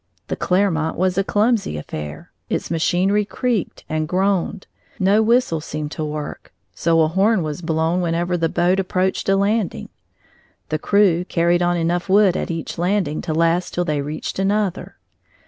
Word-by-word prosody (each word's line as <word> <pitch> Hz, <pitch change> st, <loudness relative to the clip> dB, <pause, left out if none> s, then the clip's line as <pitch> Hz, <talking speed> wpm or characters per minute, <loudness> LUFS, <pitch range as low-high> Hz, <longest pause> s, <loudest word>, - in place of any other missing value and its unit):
The -, -, -1 dB
Clermont 180 Hz, -4 st, 0 dB
was 185 Hz, 0 st, +1 dB
a -, -, +2 dB
clumsy 210 Hz, -, +1 dB
affair; 75 Hz, 0 st, -7 dB, 0.2 s
its -, -, -2 dB
machinery 185 Hz, +5 st, +2 dB
creaked 230 Hz, -1 st, -2 dB
and 155 Hz, 0 st, -2 dB
groaned; 190 Hz, +1 st, 0 dB, 0.3 s
no 195 Hz, +3 st, +3 dB
whistle 225 Hz, -8 st, +2 dB
seemed 150 Hz, -1 st, -5 dB
to 160 Hz, -, -4 dB
work, 150 Hz, -1 st, -6 dB, 0.2 s
so 165 Hz, 0 st, +2 dB
a 155 Hz, -, +4 dB
horn 190 Hz, +3 st, +2 dB
was 155 Hz, +2 st, -4 dB
blown 165 Hz, +1 st, 0 dB
whenever 175 Hz, +1 st, 0 dB
the 165 Hz, -1 st, 0 dB
boat 175 Hz, +3 st, +2 dB
approached 190 Hz, 0 st, -1 dB
a 195 Hz, -, +4 dB
landing. 200 Hz, 0 st, 0 dB, 0.8 s
The 155 Hz, -, -1 dB
crew 190 Hz, -2 st, +3 dB
carried 170 Hz, 0 st, +1 dB
on 175 Hz, 0 st, +2 dB
enough 175 Hz, +3 st, -1 dB
wood 195 Hz, -2 st, +5 dB
at -, -, -2 dB
each 165 Hz, 0 st, -5 dB
landing 180 Hz, -4 st, 0 dB
to 160 Hz, -, -3 dB
last 165 Hz, +2 st, +1 dB
till 175 Hz, -, 0 dB
they 150 Hz, -3 st, -1 dB
reached 150 Hz, +5 st, -5 dB
another. 195 Hz, -1 st, -1 dB
175 Hz, 165 wpm, -21 LUFS, 160-195 Hz, 0.8 s, wood